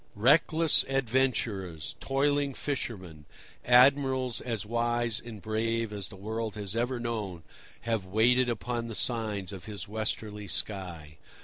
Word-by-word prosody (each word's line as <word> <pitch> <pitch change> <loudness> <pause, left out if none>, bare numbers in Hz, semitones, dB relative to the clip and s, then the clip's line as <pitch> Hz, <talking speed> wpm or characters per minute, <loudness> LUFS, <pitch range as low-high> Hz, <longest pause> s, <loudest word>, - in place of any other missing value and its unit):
Reckless 155 +8 +4
adventurers, 115 - 0
toiling 140 0 +1
fishermen, 95 - -4 0.4
admirals 130 0 +4
as 115 -4 -3
wise 120 0 0
and 115 -3 -8
brave 115 0 -1
as 100 -4 -5
the - - -11
world 110 +2 -4
has 105 -1 -2
ever 120 +2 0
known, 105 -8 -4 0.4
have 115 -3 -1
waited 120 +6 +3
upon 120 0 -2
the 115 - -6
signs 105 -5 -1
of 95 - -8
his 105 -4 -6
westerly 105 -1 -3
sky. 85 -5 -4
115 Hz, 125 wpm, -29 LUFS, 100-125 Hz, 0.4 s, Reckless